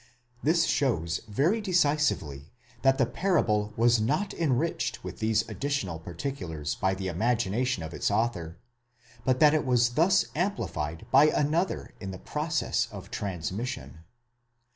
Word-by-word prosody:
*4 - - -27 0.4
This 165 +2 +3
shows 85 - 0
very 155 - +1
decisively 145 - +1 0.3
that 135 0 +4
the 135 - +3
parable 115 - +1
was 115 0 +4
not 190 - 0
enriched 140 -5 -1
with - - -7
these 110 0 +1
additional 135 - -2
particulars 85 - -4
by 95 0 0
the 95 0 -4
imagination 110 +2 0
of 80 +1 -7
its 75 - 0
author, 100 -6 -1 0.7
but 130 -1 +2
that 150 -1 +6
it 155 - +2
was 120 -3 +3
thus 165 +10 +3
amplified 85 - -2
by 135 +3 +7
another 155 +5 0
in 95 - -6
the 95 - -6
process 150 - -1
of - - -10
transmission. 100 - -4
120 Hz, 140 wpm, -28 LUFS, 95-150 Hz, 0.7 s, by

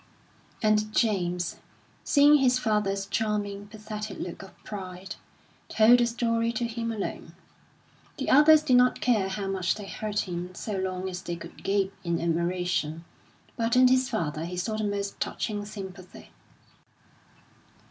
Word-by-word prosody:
And 215 0 +2
James, 180 -6 0 0.5
seeing 290 +1 +6
his 255 -2 +3
father's 210 -4 0
charming, 205 -1 -2
pathetic 215 -1 -7
look 175 - -6
of 195 - -13
pride, 190 -1 -7 0.5
told 230 +3 +6
the 240 - +3
story 230 -1 0
to 245 0 -1
him 230 0 -3
alone. 215 -3 -5 0.8
The 270 - -1
others 300 +2 +7
did 255 -5 +4
not 250 0 +4
care 220 -6 +2
how 195 +1 -3
much 190 -3 0
they 210 - -8
hurt 210 +1 -2
him 180 0 -5
so 210 +3 -4
long 185 0 -2
as 180 -1 -5
they 175 -2 -4
could 170 - -11
gape 195 0 0
in 170 -1 -1
admiration, 170 -1 -1 0.5
but 230 +1 0
in 255 0 +7
his 255 0 +3
father 155 -1 -2
he 180 +1 -6
saw 205 +5 -2
the 215 0 -1
most 200 -1 -3
touching 205 -1 -3
sympathy. 190 -3 -10
205 Hz, 145 wpm, -27 LUFS, 185-230 Hz, 0.8 s, others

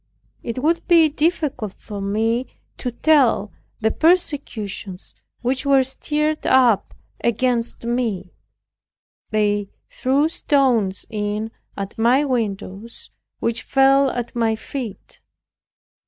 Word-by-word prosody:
It 230 - -5
would 335 +2 +1
be 330 -3 +6
difficult 295 - -1
for 205 -1 -7
me 225 +5 0 0.3
to 250 - -2
tell 245 -6 +3 0.3
the 220 0 +2
persecutions 275 - -1 0.3
which 260 +2 0
were 275 -2 +4
stirred 300 +3 -2
up 245 -6 +3 0.3
against 235 0 0
me. 225 -7 -2 1.0
They 205 -2 +1 0.2
threw 275 +4 +2
stones 255 -11 +1
in 210 +1 -2 0.3
at 200 +2 -6
my 250 +6 +4
windows 220 -3 -4 0.3
which 230 0 0
fell 270 0 +4
at 245 -1 -4
my 225 -2 +1
feet. 225 -2 -7
240 Hz, 105 wpm, -21 LUFS, 215-275 Hz, 1.0 s, be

